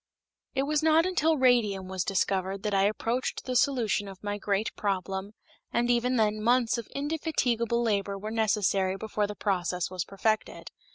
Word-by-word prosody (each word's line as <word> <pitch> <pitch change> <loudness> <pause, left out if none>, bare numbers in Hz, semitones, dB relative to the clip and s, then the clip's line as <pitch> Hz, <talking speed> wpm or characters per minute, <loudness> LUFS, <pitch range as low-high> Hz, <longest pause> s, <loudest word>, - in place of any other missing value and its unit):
It 265 - +2
was 300 +1 +1
not 320 +1 +4
until 325 -4 +2
radium 225 -7 +2
was 185 -1 -2
discovered 195 0 -1
that 210 -1 -1
I 195 0 +3
approached 230 +4 -2
the 255 - -3
solution 235 -6 +1
of 195 0 -11
my 205 0 -3
great 205 +1 -1
problem, 195 0 -2 0.4
and 240 +1 +1
even 245 +1 +1
then 215 -2 +1
months 240 +1 +2
of 230 - -7
indefatigable 265 -6 0
labor 200 -3 0
were 210 +2 -6
necessary 200 -4 +1
before 210 0 -2
the 210 - -6
process 180 -3 -1
was 185 -2 -2
perfected. 215 +2 -2
215 Hz, 165 wpm, -28 LUFS, 195-245 Hz, 0.4 s, not